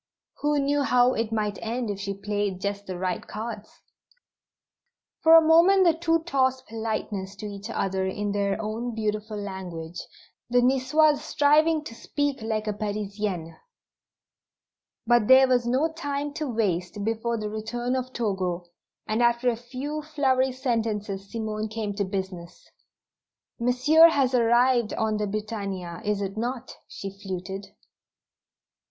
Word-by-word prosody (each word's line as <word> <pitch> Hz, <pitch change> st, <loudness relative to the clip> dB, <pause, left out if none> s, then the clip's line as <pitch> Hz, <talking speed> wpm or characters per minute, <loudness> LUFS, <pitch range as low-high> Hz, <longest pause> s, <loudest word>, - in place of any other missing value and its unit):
Who 295 Hz, 0 st, +1 dB
knew 285 Hz, +1 st, +1 dB
how 250 Hz, -2 st, +4 dB
it 225 Hz, -1 st, -2 dB
might 210 Hz, -2 st, -1 dB
end 230 Hz, 0 st, -2 dB
if 200 Hz, -, -6 dB
she 200 Hz, 0 st, -3 dB
played 205 Hz, -2 st, -2 dB
just 200 Hz, +1 st, -4 dB
the 185 Hz, -1 st, -4 dB
right 180 Hz, 0 st, -2 dB
cards? 215 Hz, 0 st, -6 dB, 1.5 s
For 325 Hz, 0 st, +8 dB
a 325 Hz, -1 st, +8 dB
moment 355 Hz, +4 st, +6 dB
the 340 Hz, -2 st, +5 dB
two 330 Hz, 0 st, +1 dB
tossed 260 Hz, -5 st, +1 dB
"politenesses" 215 Hz, -3 st, -4 dB
to 210 Hz, -, -7 dB
each 205 Hz, +1 st, -7 dB
other 190 Hz, -3 st, -1 dB
in 205 Hz, +2 st, -2 dB
their 200 Hz, 0 st, 0 dB
own 220 Hz, +2 st, -3 dB
beautiful 215 Hz, 0 st, -2 dB
language, 180 Hz, -4 st, -6 dB, 0.5 s
the 245 Hz, +1 st, +4 dB
Nicoise 285 Hz, +4 st, +3 dB
striving 305 Hz, +1 st, +3 dB
to 230 Hz, -, -8 dB
speak 280 Hz, +3 st, -2 dB
like 220 Hz, -1 st, -2 dB
a 210 Hz, -, -1 dB
Parisienne. 205 Hz, -5 st, -3 dB, 1.5 s
But 240 Hz, -2 st, +3 dB
there 260 Hz, 0 st, +8 dB
was 245 Hz, -2 st, +2 dB
no 285 Hz, +7 st, +1 dB
time 290 Hz, -2 st, -3 dB
to 305 Hz, -1 st, -3 dB
waste 200 Hz, -3 st, -1 dB
before 225 Hz, +2 st, -1 dB
the 210 Hz, -1 st, -4 dB
return 240 Hz, +4 st, -2 dB
of 255 Hz, 0 st, -3 dB
Togo, 190 Hz, -7 st, -2 dB, 0.4 s
and 220 Hz, +2 st, 0 dB
after 235 Hz, +1 st, +3 dB
a -, -, -3 dB
few 260 Hz, +6 st, -5 dB
flowery 265 Hz, -4 st, +1 dB
sentences 220 Hz, -6 st, -2 dB
Simone 215 Hz, -1 st, -3 dB
came 215 Hz, -1 st, -4 dB
to 200 Hz, 0 st, -1 dB
business. 190 Hz, -3 st, -6 dB, 0.9 s
"Monsieur 255 Hz, +7 st, +6 dB
has 270 Hz, -5 st, +1 dB
arrived 240 Hz, -1 st, +3 dB
on 220 Hz, -1 st, 0 dB
the 210 Hz, 0 st, -1 dB
Britannia, 200 Hz, -4 st, -4 dB
is 205 Hz, -2 st, -1 dB
it 195 Hz, +2 st, -5 dB
not?" 245 Hz, +2 st, -4 dB
she 195 Hz, -, -7 dB
fluted. 190 Hz, 0 st, -5 dB
225 Hz, 145 wpm, -26 LUFS, 200-260 Hz, 1.5 s, For